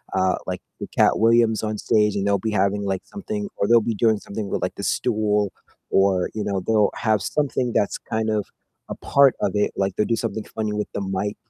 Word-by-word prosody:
uh, 95 Hz, 0 st, +2 dB
like, -, -, -3 dB, 0.2 s
the -, -, -5 dB
Katt -, -, +4 dB
Williams 115 Hz, -1 st, +4 dB
on 110 Hz, -1 st, -2 dB
stage 105 Hz, -1 st, +2 dB
and 100 Hz, -1 st, -1 dB
they'll 100 Hz, 0 st, +2 dB
be 110 Hz, -, -2 dB
having, 100 Hz, 0 st, +1 dB
like, 95 Hz, -1 st, -1 dB
something 205 Hz, 0 st, -5 dB
or 100 Hz, -, +1 dB
they'll 115 Hz, 0 st, +6 dB
be 115 Hz, -, -1 dB
doing 110 Hz, 0 st, +3 dB
something 100 Hz, +1 st, -6 dB
with, -, -, -2 dB
like, -, -, -2 dB
the -, -, -7 dB
stool 105 Hz, -3 st, 0 dB, 0.4 s
or, 95 Hz, -2 st, +2 dB
you 110 Hz, -, -3 dB
know, 100 Hz, -2 st, -1 dB
they'll 110 Hz, -2 st, +3 dB
have 110 Hz, -2 st, +1 dB
something 130 Hz, -5 st, -1 dB
that's 100 Hz, -, +1 dB
kind 110 Hz, -1 st, -3 dB
of 105 Hz, -2 st, 0 dB, 0.4 s
a -, -, -4 dB
part 140 Hz, -2 st, +4 dB
of -, -, +1 dB
it, 105 Hz, -, +1 dB
like, 95 Hz, -1 st, 0 dB
they'll 105 Hz, -, +2 dB
do 115 Hz, -, +1 dB
something 110 Hz, -1 st, -3 dB
funny 110 Hz, -1 st, -1 dB
with 105 Hz, 0 st, -2 dB
the 100 Hz, -, -3 dB
mic 100 Hz, +2 st, -2 dB
105 Hz, 225 wpm, -23 LUFS, 100-115 Hz, 0.4 s, they'll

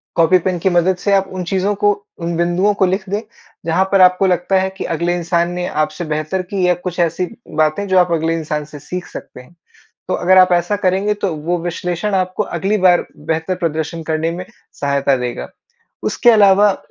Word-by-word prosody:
Copy pen 180 Hz, +2 st, +3 dB
की 190 Hz, -, +1 dB
मदद 175 Hz, +1 st, +2 dB
से 200 Hz, +2 st, -1 dB
आप 195 Hz, -1 st, +2 dB
उन 185 Hz, -1 st, -4 dB
चीज़ों 195 Hz, +2 st, +1 dB
को, 205 Hz, +1 st, +3 dB, 0.3 s
उन 170 Hz, -1 st, -3 dB
बिंदुओं 175 Hz, +4 st, +2 dB
को 195 Hz, -1 st, +2 dB
लिख 190 Hz, +2 st, -2 dB
दें, 205 Hz, +2 st, -1 dB, 0.4 s
जहाँ 170 Hz, +3 st, +2 dB
पर 195 Hz, -1 st, +4 dB
आपको 180 Hz, +1 st, +5 dB
लगता 180 Hz, +1 st, +1 dB
है 190 Hz, 0 st, 0 dB
कि -, -, -4 dB
अगले 170 Hz, +2 st, 0 dB
इंसान 170 Hz, 0 st, 0 dB
ने 180 Hz, 0 st, -3 dB
आपसे 155 Hz, +3 st, -2 dB
बेहतर 155 Hz, +4 st, -2 dB
की 190 Hz, -3 st, +1 dB
या 180 Hz, -, +4 dB
कुछ 180 Hz, 0 st, -6 dB
ऐसी 170 Hz, +1 st, +1 dB, 0.4 s
बातें 155 Hz, +7 st, 0 dB
जो 190 Hz, -, +2 dB
आप 175 Hz, -1 st, +2 dB
अगले 165 Hz, 0 st, +1 dB
इंसान 150 Hz, -1 st, -3 dB
से 150 Hz, 0 st, -11 dB
सीख 180 Hz, +4 st, -6 dB
सकते -, -, -10 dB
हैं। 140 Hz, +7 st, -20 dB, 0.5 s
तो 185 Hz, -, -1 dB
अगर 185 Hz, +1 st, +3 dB
आप 185 Hz, 0 st, +6 dB
ऐसा 175 Hz, +4 st, +1 dB
करेंगे 195 Hz, +1 st, +1 dB
तो 200 Hz, -4 st, -2 dB
वो 165 Hz, +4 st, -2 dB
विश्लेषण 175 Hz, +3 st, -2 dB
आपको 185 Hz, -1 st, -1 dB
अगली 195 Hz, +5 st, -1 dB
बार 180 Hz, -2 st, +4 dB, 0.2 s
बेहतर 160 Hz, +3 st, -1 dB
प्रदर्शन 165 Hz, -1 st, -3 dB
करने 160 Hz, +1 st, -1 dB
में 180 Hz, +2 st, -6 dB, 0.3 s
सहायता 140 Hz, -1 st, 0 dB
देगा। 125 Hz, -1 st, -4 dB, 0.6 s
उसके 240 Hz, -, +3 dB
अलावा 205 Hz, -2 st, +5 dB
180 Hz, 200 wpm, -17 LUFS, 165-190 Hz, 0.6 s, आप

